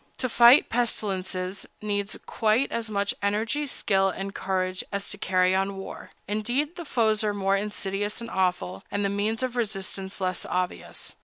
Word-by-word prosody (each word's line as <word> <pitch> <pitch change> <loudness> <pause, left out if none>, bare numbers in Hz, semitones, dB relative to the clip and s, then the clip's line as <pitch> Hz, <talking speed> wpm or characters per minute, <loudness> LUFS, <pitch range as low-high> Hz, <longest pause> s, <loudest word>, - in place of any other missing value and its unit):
To 255 - 0
fight 240 +3 +7
pestilences 190 -5 -1
needs 205 -1 -2
quite 225 +4 +2
as 230 -1 -2
much 200 -1 0
energy, 220 +8 0
skill, 195 -6 +2
and 195 +1 -4
courage 185 -1 -1
as 200 0 -3
to 205 - -5
carry 185 -1 +3
on 195 +1 0
war; 195 - -8 0.2
indeed, 240 - -1
the 345 - -7
foes 220 -5 +2
are 210 -1 0
more 195 0 +2
insidious 205 0 -1
and 235 - -6
awful, 180 -1 0
and 205 0 -1
the - - +2
means 210 +4 0
of 255 -1 -2
resistance 195 -4 -2
less 185 -2 0
obvious. 180 0 -3
200 Hz, 165 wpm, -26 LUFS, 190-225 Hz, 0.2 s, fight